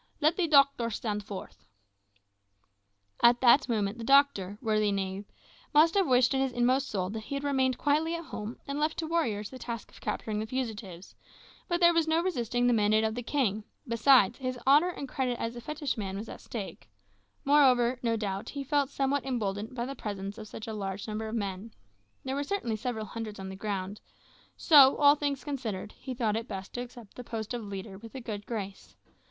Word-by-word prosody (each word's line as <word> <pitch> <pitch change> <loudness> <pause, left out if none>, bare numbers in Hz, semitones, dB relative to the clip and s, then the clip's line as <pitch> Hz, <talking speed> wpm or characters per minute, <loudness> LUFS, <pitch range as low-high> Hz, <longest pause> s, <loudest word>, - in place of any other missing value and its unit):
Let 310 +2 +3
the 360 -3 +1
doctor 275 -5 +4
stand 210 -1 -3
forth." 200 -2 -9 1.6
At 240 0 +6
that 260 +2 +5
moment 215 -1 -1
the - - -5
doctor, 250 -7 +3
worthy 215 -3 +1
knave, 195 0 -3 0.5
must 320 +2 +6
have 390 -3 +2
wished 250 0 +4
in 265 - +1
his 270 -1 0
inmost 255 +3 +2
soul 185 -2 -2
that 220 - -4
he 280 - -4
had 280 - -3
remained 265 -3 +1
quietly 310 +3 +1
at 335 0 -6
home 215 -2 -6
and 280 +1 -3
left 305 +1 0
to 325 - -2
warriors 235 -11 -1
the 260 - -9
task 230 -3 -6
of - - -17
capturing 215 -1 -3
the 220 - -3
fugitives, 215 -8 -5 0.5
but 345 -1 0
there 345 -1 +6
was 330 -1 +2
no 320 +1 +3
resisting 245 - 0
the 245 - +4
mandate 215 0 +3
of 220 0 0
the 245 - -4
king; 230 -5 0 0.2
besides, 235 -1 +4
his 255 -1 -3
honour 295 +6 +5
and 285 -6 -6
credit 255 -2 -2
as 230 +1 -3
a 240 - -7
fetishman 255 -10 -3
was 215 +3 -6
at - - -9
stake; 200 - -7 0.6
moreover, 260 -4 +4
no 230 -2 0
doubt 200 -2 -3
he 280 -1 -5
felt 285 -1 +1
somewhat 275 -1 0
emboldened 220 -2 -3
by 240 -1 -2
the 270 - -5
presence 200 -3 -6
of 215 - -8
such 215 - -8
a 220 - -5
large 195 -1 -4
number 220 +1 -4
of 220 - -4
men 200 0 -4 0.5
there 265 - -3
were 285 +1 -1
certainly 285 - -2
several 220 0 -3
hundreds 215 -1 -6
on 190 0 -6
the 190 - -7
ground 200 0 -4 0.6
so, 280 -4 +7
all 285 -1 +7
things 285 -3 -2
considered, 225 -8 -4
he 260 -1 -8
thought 225 -4 0
it 225 +2 -3
best 195 -2 -7
to 245 - -3
accept 240 -4 -11
the 250 - -8
post 225 -1 -5
of 240 -2 -4
leader 195 -1 -7
with 230 +3 -12
a - - -4
good 215 -4 -6
grace. 200 -4 -6
235 Hz, 205 wpm, -29 LUFS, 210-275 Hz, 1.6 s, so